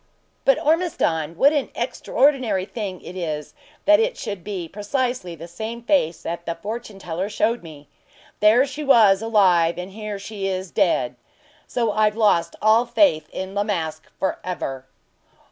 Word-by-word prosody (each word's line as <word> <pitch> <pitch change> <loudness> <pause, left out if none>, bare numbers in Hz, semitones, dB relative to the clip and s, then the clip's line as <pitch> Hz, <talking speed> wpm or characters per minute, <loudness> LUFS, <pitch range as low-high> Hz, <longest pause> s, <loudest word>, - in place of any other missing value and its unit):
"But, - - +5
Ormiston, 170 - 0
what 285 +8 +5
an 290 -3 0
extraordinary 255 -9 +1
thing 200 -4 -5
it 180 - -9
is 155 -5 -4 0.3
that 310 +1 +6
it 480 +2 0
should 205 -8 -5
be 185 -4 -4
precisely 210 - -2
the 165 +1 -9
same 220 +7 -6
face 235 - +1
that 170 +1 -5
the 170 - -1
fortune 210 +3 -6
teller 180 +1 -4
showed 225 +3 0
me. 150 -3 -12 0.5
There 220 +5 +5
she 285 +2 -6
was 220 -8 +5
alive, 185 -7 +3
and 180 +2 -6
here 210 0 -5
she 195 0 -5
is 185 -1 -3
dead; - - +1 0.5
so 230 -3 0
I've 215 0 +2
lost 170 -6 +2
all 220 +3 +5
faith 235 - +3
in 190 +1 -5
La 205 0 +1
Masque 160 -6 -3
for 190 - -1
ever." 135 -7 -5
205 Hz, 160 wpm, -22 LUFS, 170-235 Hz, 0.5 s, that